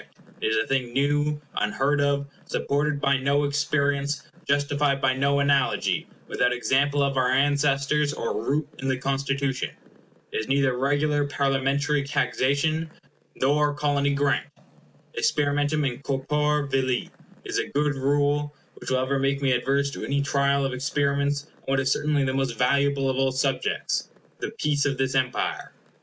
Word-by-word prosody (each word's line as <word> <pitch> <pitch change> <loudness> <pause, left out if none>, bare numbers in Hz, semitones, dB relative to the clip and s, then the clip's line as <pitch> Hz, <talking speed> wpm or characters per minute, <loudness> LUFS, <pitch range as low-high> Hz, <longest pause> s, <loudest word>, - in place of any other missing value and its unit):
It - - +1
is 110 0 +1
a 110 - +1
thing 125 -3 -1
new, 145 +2 +1 0.2
unheard 140 +7 +1
of; 140 0 +1 0.2
supported 145 0 0
by 140 -1 +2
no 140 +2 +1
experience; 145 0 0 0.2
justified 145 0 +1
by 130 -1 +2
no 140 +2 +1
analogy; 140 -2 +1 0.2
without 125 - +1
example 140 +3 +1
of 135 -1 0
our 125 -1 +2
ancestors, 145 +1 +2
or 115 - -3
root 145 +2 0
in 135 - -3
the 130 -1 +1
Constitution. 135 0 -1 0.6
It - - -3
is 110 - -4
neither 135 -2 +2
regular 145 +2 +1
Parliamentary 140 +1 +1
taxation, 140 +3 0 0.5
nor 145 +2 +2
Colony 145 -1 +1
grant. 140 0 +1 0.7
Experimentum 145 - +1
in 125 -2 -2
corpore 150 +2 0
vili 130 -2 0 0.3
is - - -1
a - - -2
good 145 0 +1
rule, 145 +2 0 0.2
which - - -7
will 130 - +2
ever 130 +1 0
make 135 0 +1
me 135 -2 +1
adverse 140 +3 +1
to - - -7
any 140 0 0
trial 140 0 +1
of 135 - -2
experiments 140 +1 0
on - - -29
what 135 0 +1
is 130 0 +1
certainly 145 -1 +1
the 130 - -1
most 135 -4 -1
valuable 140 +2 +2
of 130 -1 0
all 135 0 +2
subjects, 135 +1 -1 0.3
the - - -3
peace 145 -1 +1
of 135 -2 -1
this 130 0 0
Empire. 130 -2 -1
140 Hz, 155 wpm, -25 LUFS, 135-145 Hz, 0.7 s, by